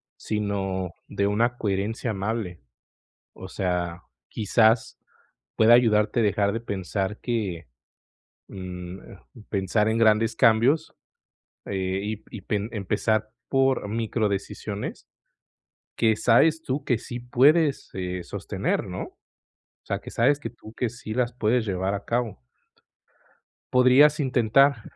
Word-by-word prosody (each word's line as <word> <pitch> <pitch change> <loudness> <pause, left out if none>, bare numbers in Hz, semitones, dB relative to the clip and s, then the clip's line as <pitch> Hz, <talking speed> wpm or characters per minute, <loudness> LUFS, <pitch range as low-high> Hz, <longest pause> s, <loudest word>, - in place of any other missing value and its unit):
sino 95 -4 -2 0.2
de 100 0 -1
una 120 +4 +1
coherencia 105 +3 -2
amable. 100 -3 -3 0.8
O 95 - -9
sea, 90 -2 -2 0.3
quizás, 110 +2 +2 0.6
pueda 115 +1 +6
ayudarte 115 -1 +4
dejar 100 -1 +1
de 115 - -3
pensar 100 -1 -3
que, 100 - -3 0.8
mm, 90 -1 -7 0.5
pensar 105 +2 +1
en 110 - +1
grandes 110 0 +3
cambios 120 +6 +3 0.7
y 95 +2 -3
y 105 - -7
pen 105 +3 -2
empezar 110 +1 -1 0.2
por 135 -5 +1
micro-decisiones 105 -2 -3 0.9
que 110 -2 +3
sabes 155 +9 +4
tú 135 +1 -3
que 120 -3 +1
sí 120 +1 -7
puedes, 140 +5 +3
eh, 90 -1 -4
sostener, - - -2
¿no?, - - -5
o - - -19 0.5
sea, - - -2
que - - -10
sabes 140 +5 +2
que 115 - -5
tú 110 -1 -14
que 125 - -1
sí 115 -2 -7
las 120 0 0
puedes 120 0 +1
llevar 95 -1 -1
a 100 - -5
cabo. 115 - -2 1.3
Podrías 135 +4 +6
intentar, 130 0 +3
110 Hz, 120 wpm, -25 LUFS, 100-120 Hz, 1.3 s, pueda